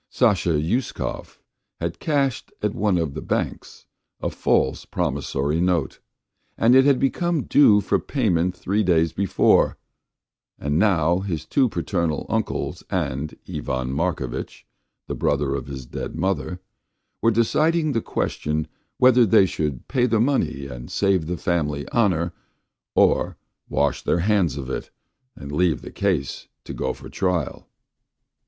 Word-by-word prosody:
Sasha 100 -9 +2
Uskov 90 - -2 0.4
had 85 +1 -3
cashed 140 -5 0
at 105 -1 +1
one 100 -3 +1
of 80 -5 -1
the - - -5
banks - - -3 0.3
a - - -2
false 65 - +1
promissory 70 +3 -1
note, 85 -6 0 0.6
and 115 +2 +4
it 130 +1 +7
had 140 -2 +5
become 165 +2 0
due 105 -8 +5
for 100 0 +1
payment 90 - 0
three 100 +4 0
days 85 -4 +2
before, 95 +2 +3 0.8
and 75 +3 0
now 90 -4 +3
his 95 -5 -4
two 130 -3 +2
paternal 85 -4 -1
uncles - - -2
and 70 +3 -2
Ivan 65 0 -3
Markovitch, 70 -5 -3 0.4
the - - -3
brother 70 -1 0
of 70 -2 -4
his 65 -2 -7
dead - - -6
mother, 95 0 -1 0.6
were 115 - +4
deciding 155 +8 +2
the 115 - 0
question 75 -5 -2 0.3
whether 125 -1 +6
they 95 -2 +5
should 75 -8 -3
pay 125 -2 +2
the 115 -2 +2
money 120 - 0
and 60 -3 -8
save 95 -5 +1
the 90 +1 -2
family 75 -6 -1
honour, 90 -7 +1 0.6
or - - +3 0.3
wash 70 -3 +1
their 85 - +1
hands 95 -5 +2
of 65 -3 -5
it 65 - -4 0.5
and 70 - -8
leave 80 -4 +1
the - - -8
case 90 -9 -1 0.2
to - - -7
go - - -2
for - - -10
trial. 90 -6 -2
90 Hz, 140 wpm, -23 LUFS, 75-110 Hz, 0.8 s, it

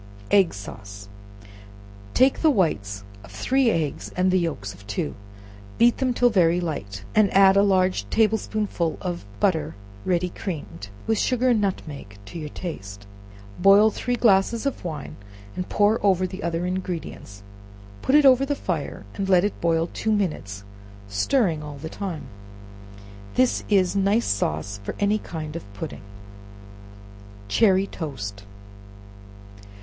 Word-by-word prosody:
Egg 195 -4 +5
Sauce. 100 0 -9 1.1
Take 260 +1 +4
the 320 - +5
whites 105 - 0 0.2
of 100 - -13
three 245 - +1
eggs 160 -8 -2
and 185 0 +3
the 185 - +3
yelks 100 - -3
of 100 +2 -16
two, 100 - -2 0.6
beat 235 +1 +4
them 260 -2 +1
till 245 0 +3
very 175 -4 +3
light, 100 - -4
and 210 -2 +4
add 195 0 +7
a 200 - +6
large 185 - +2
table 220 -1 +3
spoonful 200 -7 -2
of 175 - -5
butter 160 -6 +1 0.3
ready 180 0 0
creamed, 150 - -6 0.2
with 225 -1 +1
sugar 255 0 +2
and 230 -4 +3
nutmeg 145 - -4
to 165 - -8
your 150 -1 -5
taste; 100 - -7 0.5
boil 200 +3 +6
three 245 +3 -2
glasses 225 +1 +3
of 275 - -2
wine, 155 -5 -6 0.4
and 180 - -4
pour 210 +2 +2
over 185 -2 +3
the 185 +2 -6
other 170 0 -2
ingredients, 175 - -5 0.6
put 265 - +2
it 300 -1 +6
over 265 0 +6
the 285 +1 0
fire, 160 - -4
and 195 -1 -3
let 185 -1 +5
it 205 - -2
boil 165 0 +2
two 220 - -1
minutes, 150 - -2 0.4
stirring 160 - +1
all 150 -1 -8
the 160 +3 -7
time. 185 -5 -5 1.1
This 255 -1 +2
is 195 -3 +3
nice 200 +4 +2
sauce 100 +1 -1
for - - -5
any 205 +1 +2
kind 155 -4 -6
of 135 -12 -8
pudding. - - -6 1.5
Cherry 190 - +3
Toast. 100 - -6
180 Hz, 145 wpm, -24 LUFS, 140-205 Hz, 1.5 s, add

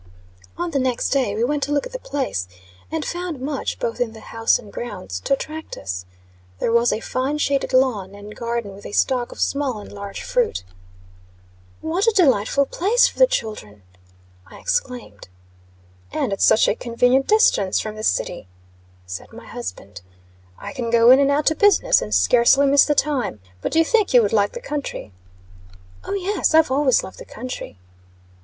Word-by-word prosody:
On 345 0 -3
the 280 - 0
next 255 -2 -1
day 255 -7 +1
we 220 - 0
went 290 +4 0
to 285 - -2
look 285 -1 +1
at - - -8
the - - -5
place, 270 - -3 0.4
and 320 -1 -2
found 350 -4 -4
much, 275 +1 -3
both 230 +1 -3
in 230 -2 -1
the 220 - -11
house 225 +1 +1
and 205 - -14
grounds, 95 - -6
to - - 0
attract 310 +3 -5
us. 90 -1 -5 0.5
There 230 - -1
was 235 +1 +3
a - - -1
fine 260 +5 -2
shaded 280 -2 0
lawn, 235 -7 +1
and 205 +1 -11
garden 235 -3 -3
with 200 +1 -10
a - - -10
stock 250 0 +1
of - - -11
small 280 -4 0
and 205 - -10
large 200 -1 -7
fruit. - - 0 1.2
"What 345 +7 -1
a 455 - +4
delightful 275 - +3
place 415 - +3
for - - -9
the - - +7
children," 215 - -4 0.6
I - - -13
exclaimed. 240 - -3 0.8
"And - - -1
at 195 - -4
such 220 - +5
a - - +3
convenient 245 +3 +1
distance 425 - +3
from 215 - -4
the 215 - -7
city," 175 - -1 0.6
said 90 0 -8
my - - -12
husband. 90 +1 -8 0.6
"I - - -8
can 240 -2 -3
go 235 +1 +6
in 260 - +7
and 280 0 +3
out 290 +1 +1
to 315 - +3
business, 410 0 +4
and 105 - -5
scarcely 235 - +4
miss 280 0 +5
the 295 - +1
time. 270 - 0 0.2
But - - -2
do - - 0
you 325 - +5
think 425 - +2
you 240 - +7
would 205 - -1
like 205 -2 +2
the 480 - -7
country?" 295 - -5 0.9
"O, - - -5
yes. 385 -4 0
I've 320 -4 +5
always 270 -1 +3
loved 190 - -10
the - - -8
country." 245 - -8
255 Hz, 190 wpm, -21 LUFS, 210-295 Hz, 1.2 s, the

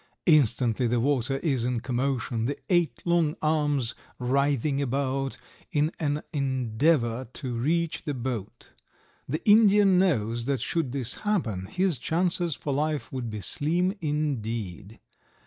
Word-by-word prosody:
Instantly 125 - +3
the 120 +1 +1
water 135 +1 +1
is 135 -8 +1
in 125 -1 0
commotion, 125 -1 -1
the 140 +4 -2
eight 175 -4 +1
long 170 -3 +2
arms 145 -5 +1 0.2
writhing 140 +2 +1
about 135 0 -1 0.3
in 150 +2 +1
an 150 -1 -1
endeavor 130 -1 +1
to 130 -4 -4
reach 160 +7 0
the 145 - -3
boat. 120 -5 -5 0.6
The 155 +9 -3
Indian 205 -3 +6
knows 120 - +1
that 135 -1 0
should 140 +2 -1
this 130 -2 -4
happen 115 - -1
his 180 - 0
chances 170 +1 0
for 145 - -3
life 150 +1 -1
would 125 -3 -3
be 105 -1 -5
slim 170 - 0
indeed. 115 - -3
140 Hz, 130 wpm, -27 LUFS, 120-155 Hz, 0.6 s, Indian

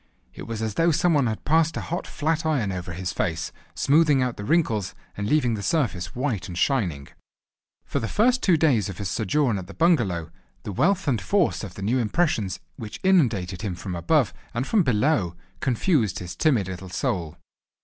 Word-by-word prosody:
It - - -9
was 115 -1 -4
as 110 -2 -2
though 165 +9 +3
some 170 +2 +3
one 140 -5 +3
had 110 -1 -4
passed 160 +1 +2
a - - -2
hot 175 +2 -4
flat 160 +2 -1
iron 140 -11 0
over 90 -1 -5
his 90 0 -4
face, 80 -1 -2 0.2
smoothing 150 -1 +4
out 125 -2 0
the 100 - -7
wrinkles, 115 - +1 0.2
and 100 +1 -3
leaving 125 -5 +2
the 105 - -3
surface 100 - -1
white 125 -6 -2
and 85 - -7
shining. 90 - 0 0.8
For 140 - -2
the 115 - -3
first 250 - +2
two 180 -4 +4
days 130 - +2
of 95 - -7
his 100 -3 -3
sojourn 115 - +1
at 90 - -8
the 100 - -11
bungalow 105 - +2 0.3
the - - -5
wealth 185 - +1
and 120 -7 +1
force 200 - +1
of 95 -4 -7
the 100 - -6
new 120 +6 +1
impressions 110 - 0 0.2
which 110 -2 -7
inundated 115 - +2
him 100 -5 -3
from 90 +2 -6
above 85 -1 +2 0.2
and 120 +2 0
from 215 +5 +3
below 120 - +1 0.2
confused 125 - +1
his 90 -1 -6
timid 120 - +2
little 95 0 -7
soul. 85 -2 -2
115 Hz, 195 wpm, -25 LUFS, 95-155 Hz, 0.8 s, smoothing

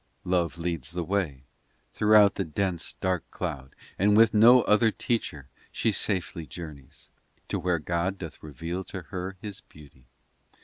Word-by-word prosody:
Love 90 -2 0
leads 85 -3 -3
the 90 -1 -2
way 85 -8 -2 0.5
Throughout 105 -1 +5
the 95 - -2
dense, 90 +1 -2
dark 95 -3 -1
cloud 65 -1 -5 0.2
And 105 +2 +4
with 115 -1 +6
no 120 +4 +7
other 110 +2 +4
teacher 100 - -3 0.2
She 115 - +1
safely 90 -6 -1
journeys 75 -2 -9 0.4
To - - -1
where 90 -1 +1
God 85 +4 -2
doth 85 -4 -9
reveal 80 +5 -5
to 95 - -7
her 95 0 -5
His 105 -3 -5
beauty. 70 -5 -18
90 Hz, 145 wpm, -27 LUFS, 80-100 Hz, 0.5 s, no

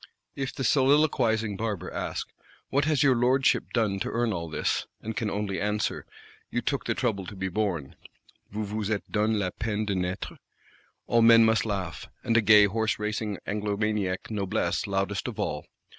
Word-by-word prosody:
If 135 -1 -3
the 135 - -3
soliloquising 125 -6 +3
Barber 105 -5 -3
ask: - - -3 0.4
'What 140 +1 +2
has 150 -4 +2
your 135 -3 +5
Lordship 130 +3 +3
done 105 -5 +1
to - - -2
earn 120 -1 0
all 85 -2 -4
this?' 80 - -1
and 110 0 -5
can 110 -4 -1
only 100 -1 -2
answer: 105 +1 -1 0.4
'You 120 - -1
took 140 +4 -2
the - - 0
trouble 100 -7 -1
to 105 - -8
be 95 0 -3
born 90 -8 -2 0.5
(Vous 105 +1 -3
vous 105 0 -3
êtes 105 -2 -1
donné 110 0 +2
la 95 -3 -1
peine 110 0 -2
de 100 - -1
naître),' 90 0 -3 0.7
all 120 - +3
men 115 0 +8
must 110 0 +2
laugh: 95 -7 -4 0.2
and 115 - +1
a 115 - +6
gay 105 -1 +7
horse 110 +2 0
racing 105 -1 -2
Anglomaniac 105 -2 -1
Noblesse 100 -3 -1
loudest 100 +1 -1
of 120 -3 -5
all. 75 -7 -2
105 Hz, 175 wpm, -27 LUFS, 100-115 Hz, 0.7 s, men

